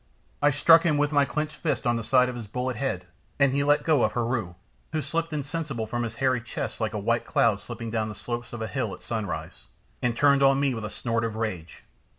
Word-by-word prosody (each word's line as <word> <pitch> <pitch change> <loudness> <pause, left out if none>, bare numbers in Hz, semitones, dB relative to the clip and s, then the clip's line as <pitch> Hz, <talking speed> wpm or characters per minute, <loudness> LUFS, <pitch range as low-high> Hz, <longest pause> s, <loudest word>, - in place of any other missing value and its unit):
I 145 - +5
struck 165 +3 +6
him 155 -3 +2
with 145 0 +1
my 145 -1 +4
clenched 150 +1 -3
fist - - -1
on 120 0 +2
the 115 - -2
side 125 +2 +4
of 125 - -4
his 115 -3 -7
bullet 125 +4 -2
head, 115 -10 -2 0.3
and 140 -2 +3
he 140 +1 +2
let 145 +1 +3
go 155 -5 +3
of 110 - +2
Heru, 115 -7 -1 0.4
who 155 - +1
slipped 165 +2 -2
insensible 145 -4 -3
from 120 +2 -3
his 115 -1 -3
hairy 130 -1 +1
chest 120 - -5
like - - -1
a - - 0
white - - +1
cloud - - +2
slipping 115 -1 -6
down 110 -1 -1
the 105 - -7
slopes 120 +2 -5
of 120 -2 -5
a - - -2
hill 130 +3 -2
at - - -18
sunrise, 100 - -4 0.4
and 120 -1 0
turned 140 -1 +4
on 135 0 +5
me 140 -2 +2
with 115 -2 -4
a - - -4
snort 115 +1 -1
of 115 -1 -2
rage. 95 -7 -4
125 Hz, 240 wpm, -26 LUFS, 115-145 Hz, 0.4 s, struck